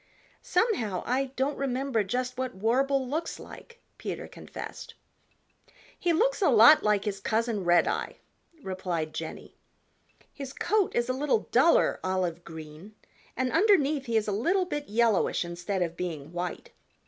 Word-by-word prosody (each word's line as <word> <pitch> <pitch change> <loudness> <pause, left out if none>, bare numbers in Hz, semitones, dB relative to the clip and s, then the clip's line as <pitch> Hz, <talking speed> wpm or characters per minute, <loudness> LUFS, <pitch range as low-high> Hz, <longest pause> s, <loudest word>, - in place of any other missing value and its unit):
"Somehow 230 - 0
I 260 +3 +1
don't 275 +2 -1
remember 265 -4 0
just 250 +5 -2
what 255 -3 -3
Warble 260 +6 +1
looks 315 +5 -3
like," 470 0 -13 0.2
Peter - - -5
confessed. - - -9 1.0
"He 350 - 0
looks 455 +8 +2
a 370 - +4
lot 235 +5 +8
like 210 -1 +1
his 200 -2 -2
cousin, 220 0 -1
Redeye," 175 -1 +2 0.5
replied 180 -4 -3
Jenny. 160 -1 -7 0.8
"His 275 -2 -7
coat 420 -2 0
is 240 0 +1
a 255 - 0
little 295 - 0
duller - - +4
olive 180 -2 -1
green 160 +5 -11 0.4
and 255 0 0
underneath 310 - +3
he 230 -1 +1
is 215 - 0
a - - 0
little 350 - +1
bit 295 -5 -5
yellowish 220 -5 +2
instead 175 +2 -2
of 170 -1 -4
being 165 -4 -5
white. 175 0 -5
230 Hz, 145 wpm, -28 LUFS, 185-275 Hz, 1.0 s, lot